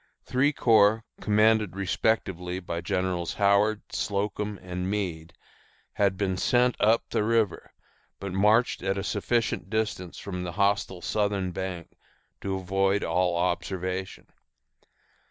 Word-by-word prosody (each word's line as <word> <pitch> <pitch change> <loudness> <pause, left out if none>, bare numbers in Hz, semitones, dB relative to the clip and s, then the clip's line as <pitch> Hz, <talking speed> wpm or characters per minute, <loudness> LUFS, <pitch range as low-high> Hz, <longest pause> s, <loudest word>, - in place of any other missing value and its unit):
Three 135 +3 +2
corps, 110 -4 +4 0.2
commanded 105 -2 +3
respectively 95 -2 -1
by 85 -2 -4
Generals 90 -1 -2
Howard, 100 +1 +3
Slocum, 105 +1 -2
and 90 0 -4
Meade, 85 -5 -3 0.6
had 100 -2 +1
been 95 -2 -1
sent 125 +4 +2
up 110 +2 +3
the - - +1
river, 110 -3 0 0.5
but 100 -2 -5
marched 105 +5 +3
at 95 +1 -1
a 100 - -2
sufficient 115 +3 -1
distance 105 -5 -2
from 90 -3 -5
the 90 -1 -5
hostile 100 -2 0
southern 100 -3 0
bank 90 -1 -5 0.5
to 95 -1 -2
avoid 95 +1 +1
all 90 +1 +1
observation. 90 +1 -2
100 Hz, 120 wpm, -27 LUFS, 90-105 Hz, 0.6 s, corps